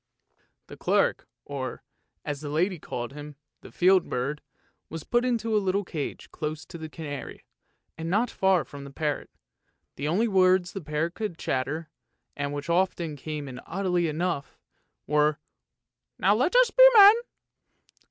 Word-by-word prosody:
The - - -12
clerk, - - +1 0.2
or, 135 -2 -5 0.4
as 145 -1 -4
the 150 - -5
lady 175 +4 0
called 120 -2 -5
him, 145 0 -9 0.3
the - - -13
field 185 0 +3
bird, 140 +4 -2 0.5
was 160 -1 -6
put 240 0 +1
into 230 -3 0
a 210 - +3
little 195 +1 0
cage 160 -5 -6
close 155 0 -5
to 170 - -10
the 160 0 -7
canary, 145 -3 -7 0.5
and 165 +1 -3
not 220 +6 +1
far 190 -3 +2
from 140 -1 -10
the 140 - -9
parrot. 150 +1 -3 0.7
The 140 - -2
only 200 +9 +2
words 185 -3 +3
the 195 - -5
parrot 155 +2 -2
could 210 -6 -4
chatter, 150 +5 -2 0.5
and 145 0 -3
which 145 +2 -5
often 170 -2 0
came 150 0 -6
in 125 -1 -8
oddly 180 -3 -1
enough, 160 -2 -3 0.5
were, 150 0 +2 0.4
" - - -61
Now 195 +3 +4
let 255 - +1
us - - +6
be - - +6
men! 410 0 +10
165 Hz, 160 wpm, -27 LUFS, 145-190 Hz, 0.7 s, men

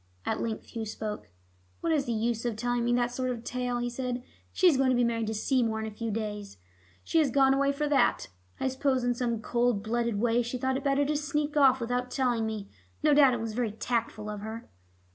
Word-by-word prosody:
At - - -1
length 225 -2 -4
Hugh 225 -2 -5
spoke. 210 - -5 0.5
"What 330 - +1
is 290 -3 +1
the 240 - -2
use 230 0 -1
of 240 -3 -1
telling 245 +2 -1
me 240 - +1
that 245 0 +1
sort 255 +1 -2
of 235 -2 -4
tale?" 250 0 -2
he 240 0 -1
said. 245 0 -3 0.3
"She 375 - 0
is 330 - +6
going 265 0 +3
to 255 - +3
be 245 - +3
married 230 -2 0
to 220 - -2
Seymour 225 -1 +1
in 220 - -3
a 220 - -5
few 225 +2 -4
days. 210 - -4 0.5
She 330 - +2
has 300 -3 +3
gone 270 +1 +4
away 280 +1 +2
for 295 +1 -1
that. 290 -2 +2 0.3
I - - 0
suppose 265 -1 0
in 245 0 +2
some 235 -2 -2
cold 235 -3 +1
blooded 235 -1 -1
way 235 +1 +2
she 240 +2 -3
thought 260 +1 0
it 270 - -3
better 280 0 +2
to 300 +1 0
sneak 295 0 -1
off 265 -3 +5
without 245 +1 -2
telling 245 -4 0
me. 215 -2 -4 0.4
No 300 -1 +5
doubt 275 -4 +6
it - - -3
was 225 -1 -4
very 235 -1 -1
tactful 225 -2 -2
of 210 -1 -4
her." 220 +2 -7
245 Hz, 240 wpm, -29 LUFS, 225-265 Hz, 0.5 s, is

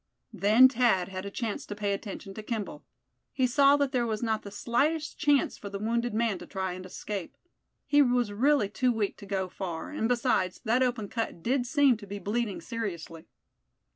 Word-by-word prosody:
Then 220 +6 +6
Thad 230 -8 +2
had 190 +1 -5
a - - -3
chance 220 0 -3
to 205 - -5
pay 205 -1 -1
attention 195 -1 -6
to 215 - -7
Kimball. 215 -1 -5 0.5
He 260 - +1
saw 280 +3 +5
that 285 -2 0
there 245 -3 +1
was 220 0 -2
not 220 -2 0
the 200 - -9
slightest 285 +10 -1
chance 290 -2 +2
for 200 - -7
the 200 - -5
wounded 235 +3 -1
man 215 -3 0
to - - -10
try 190 -2 -3
and 185 +1 -8
escape. 195 0 -6 0.5
He 290 0 +4
was 245 -5 +2
really 265 +1 +3
too 250 +5 +1
weak 215 -4 -1
to 200 - -11
go 190 -2 -1
far; 175 - -5
and 260 -7 -1
besides, 235 -7 +1
that 235 +3 +2
open 245 -5 0
cut 225 -7 -4
did 250 +2 +1
seem 280 -3 +4
to 205 -1 -12
be 200 +1 -5
bleeding 210 +1 -2
seriously. 170 -8 -6
220 Hz, 200 wpm, -28 LUFS, 200-250 Hz, 0.5 s, Then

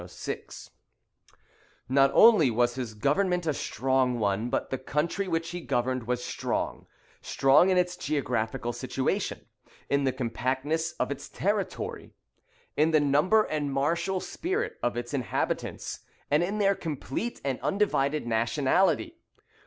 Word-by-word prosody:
] - - -35
Not 135 +2 +4
only 215 - +7
was 120 +1 +2
his 120 -4 -5
government 175 - +1
a 155 - +1
strong 130 -1 0
one, 105 +2 0
but - - -2
the 130 - -2
country 160 +8 -1
which 165 -1 -1
he 175 0 -5
governed 125 -4 -1
was 125 0 -1
strong: - - -3 0.3
strong 135 +7 +4
in 185 - +3
its 180 0 +1
geographical 120 -8 -2
situation, - - -2 0.5
in 140 0 +2
the 135 - +2
compactness 130 +6 -2
of 125 - -2
its 140 0 -6
territory, 200 -1 -3 0.6
in 155 +2 +3
the 155 -1 +4
number 150 +10 +4
and 150 -5 -2
martial 170 +7 0
spirit 385 - -3
of 120 0 -1
its 120 +2 -5
inhabitants, 125 -8 -2 0.3
and 150 +2 +4
in 195 +4 -1
their 200 -1 +3
complete 165 - -4
and 135 -2 -1
undivided 155 - +1
nationality. 135 - +1
140 Hz, 135 wpm, -28 LUFS, 125-175 Hz, 0.6 s, only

